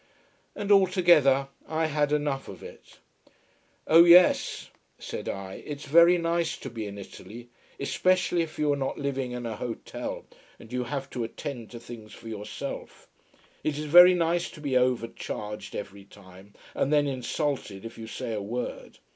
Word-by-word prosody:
And 205 0 -3
altogether 175 -9 +5 0.2
I 160 0 0
had 150 -1 0
enough 145 -2 -1
of - - -10
it. - - -13 0.9
"Oh 165 +2 +7
yes," 175 +1 +5 0.3
said - - -6
I, 95 -1 -6
"it's 145 0 -7
very 170 +5 +6
nice 170 0 -1
to 135 - -8
be 110 -3 -5
in 100 0 -8
Italy: 115 +4 -11 0.3
especially 185 +4 +1
if 165 -1 -5
you 150 -1 +2
are - - 0
not 135 -1 -3
living 135 -2 -2
in 125 -1 -5
an 110 -2 -4
hotel, 115 0 -6 0.3
and 115 +2 -14
you 125 -1 -1
have 135 +2 -4
to 125 - -3
attend 120 0 -6
to 120 - -9
things 115 -2 -11
for 115 - -11
yourself. 105 -1 -7 0.6
It 150 -2 -1
is 150 - -4
very 175 +4 +8
nice 170 0 0
to - - -13
be 140 -3 -2
overcharged 115 -4 -2
every 100 -1 -7
time, 100 0 -16 0.2
and 140 - 0
then 145 -1 +4
insulted 130 -5 -3
if 115 0 -9
you 110 - -7
say 115 - -5
a 105 - -3
word. 120 +5 -5
135 Hz, 165 wpm, -27 LUFS, 115-155 Hz, 0.9 s, very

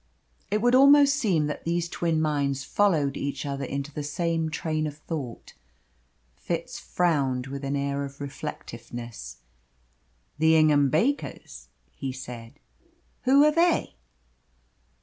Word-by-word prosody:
It 210 +1 0
would 245 0 +4
almost 280 +2 +7
seem 190 - +1
that 150 - -4
these 170 0 -1
twin 165 -2 -1
minds 140 -3 0
followed 155 -6 +1
each 140 +1 -4
other 140 -1 -3
into 140 +2 -4
the 150 - -4
same 165 +2 -1
train 155 0 -2
of 145 -1 -7
thought. 150 -6 -6 0.8
Fitz - - -4
frowned 140 -8 0
with 140 +1 -7
an 140 +1 -1
air 140 0 -1
of 140 0 -8
reflectiveness. 120 - -8 1.0
"The 160 +1 +5
Ingham 150 -3 +4
Bakers," 235 - -2 0.2
he 135 -2 -5
said. 125 -2 -9 0.7
"Who 275 +3 +6
are 300 - +5
they?" 335 +2 +2
150 Hz, 130 wpm, -26 LUFS, 140-170 Hz, 1.0 s, almost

